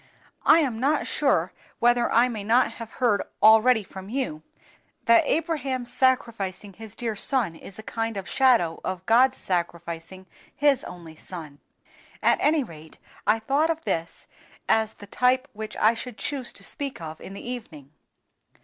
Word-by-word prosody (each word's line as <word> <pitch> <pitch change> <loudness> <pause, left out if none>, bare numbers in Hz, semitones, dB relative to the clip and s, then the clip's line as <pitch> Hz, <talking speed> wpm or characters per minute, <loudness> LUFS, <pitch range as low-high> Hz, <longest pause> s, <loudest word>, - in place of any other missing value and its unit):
"I 330 - +7
am 250 -7 -1
not 285 +5 +1
sure - - +1 0.2
whether 240 0 +3
I 235 +2 +5
may 220 -5 -5
not 235 +5 +3
have 230 - -6
heard 235 -6 +2 0.2
already 220 +1 +6
from 190 0 -10
you 240 - -3 0.6
that 230 0 +5
Abraham's 275 -6 -1
sacrificing 215 -7 0
his 220 +1 -10
dear 230 -3 -2
son 220 -5 0
is 190 - -10
a 220 - -9
kind 225 -1 -3
of 190 -2 -5
shadow 230 -7 +3
of 185 0 -4
God's 255 +3 +4
sacrificing 170 0 -4 0.3
His 285 -3 +3
only 165 -3 -10
Son; 155 -6 -9 0.6
at - - +4
any 300 -1 +3
rate, 160 -7 -13 0.3
I 215 +2 +5
thought 275 +8 +1
of 325 0 -2
this 165 0 -2 0.4
as 220 0 +2
the 205 - -12
type 255 +5 +1
which 215 0 -7
I 220 +2 +4
should 235 -1 -6
choose 270 -4 -3
to - - -12
speak 280 -3 -5
of 160 -1 -8
in 195 - -9
the 200 - -9
evening." 165 - -8
225 Hz, 160 wpm, -25 LUFS, 185-255 Hz, 0.6 s, I